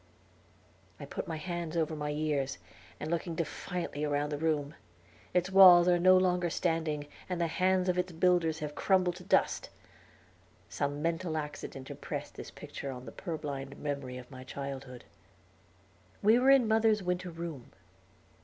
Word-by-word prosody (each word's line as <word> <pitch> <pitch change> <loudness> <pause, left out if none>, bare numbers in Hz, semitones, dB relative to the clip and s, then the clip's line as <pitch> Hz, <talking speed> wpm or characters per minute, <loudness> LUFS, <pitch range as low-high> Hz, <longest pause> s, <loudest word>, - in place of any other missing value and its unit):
I - - -7
put - - -5
my 160 - -3
hands 170 0 -4
over 160 -1 0
my 150 -1 -3
ears, 150 -2 -1 0.4
and 155 - -4
looked 170 0 -2
defiantly 170 -1 -4
round 145 0 0
the 145 - -3
room. 150 -2 0 0.6
Its 180 +1 +1
walls 180 -2 +9
are 175 -1 +4
no 185 +1 +7
longer 180 -1 +2
standing, 160 -3 -1 0.2
and 180 -1 -2
the 170 - +2
hands 185 +2 +1
of 180 0 +1
its 180 0 -1
builders 170 -1 +2
have 150 -1 -4
crumbled 185 -1 +2
to 180 - -11
dust. 355 - +1 1.0
Some 145 +1 -2
mental 165 -1 -1
accident 150 -3 -6
impressed - - -6
this - - -8
picture 140 - -8
on 125 -1 -8
the 115 - -8
purblind 145 - -5
memory 140 -3 -4
of 125 - -9 0.2
childhood. 135 -3 -6 1.2
We 220 +4 +6
were 260 +2 +4
in 270 -4 +6
mother's 220 -1 +3
winter 180 0 -2
room. 165 -6 -7
165 Hz, 155 wpm, -31 LUFS, 145-180 Hz, 1.2 s, walls